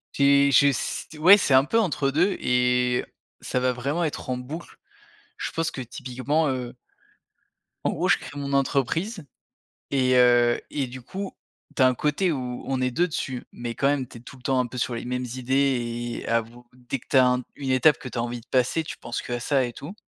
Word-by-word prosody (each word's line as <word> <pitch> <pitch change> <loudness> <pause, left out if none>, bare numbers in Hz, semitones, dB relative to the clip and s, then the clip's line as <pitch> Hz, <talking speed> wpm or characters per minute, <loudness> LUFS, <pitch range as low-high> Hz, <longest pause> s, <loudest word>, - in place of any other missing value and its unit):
J'ai 140 0 +4
je 140 +1 +6
s 135 -3 -1
ouais, 180 +6 +8
c'est 165 -8 +1
un 130 0 +7
peu 225 +11 +1
entre 150 - 0
2 175 +8 +2
et 125 0 +2 0.3
ça 125 - -2
va 130 0 +2
vraiment 140 +7 -2
être 150 -3 -4
en 125 - -1
boucle. 145 +7 -8 0.6
Je - - -3
pense 165 0 -1
que, 135 - -7
typiquement, 130 +4 -2
heu 125 -2 -4 1.1
en - - +2
gros, - - -1
je - - +5
crée 145 - -8
mon 140 0 -4
entreprise 150 - 0 0.7
et 130 -2 +3
heu 120 -1 +5
et 140 -3 -1
du 130 +1 -9
coup, 190 +10 -6 0.4
tu - - 0
as - - +7
un 130 - +3
côté 150 +8 0
où 125 -4 -4
on 130 -1 -1
est 130 - +2
2 175 +8 +1
dessus 130 -6 -4
mais 120 -1 -6
quand 140 - +1
même, 140 -2 0
tu 120 - -12
es - - -12
tout 125 - -12
le 130 - -17
temps 130 0 +1
un 125 - +2
peu 125 - -9
sur 120 0 -1
les 115 - -5
mêmes 125 0 -2
idées 120 -2 -1
et - - -9
avoue 115 +1 -2
dès 125 +1 -5
que - - -24
tu 135 - +3
as 130 - +7
un 125 0 +1
une 140 -2 -5
étape 135 +3 +4
que 130 - -7
tu - - -7
as - - +1
envie 120 0 -4
de - - -25
passer, 130 +5 +1
tu - - -7
penses 120 - -5
qu'à 120 0 -4
ça 135 +2 +1
et 120 -1 -4
tout 150 +10 -8
130 Hz, 225 wpm, -25 LUFS, 125-145 Hz, 1.1 s, ouais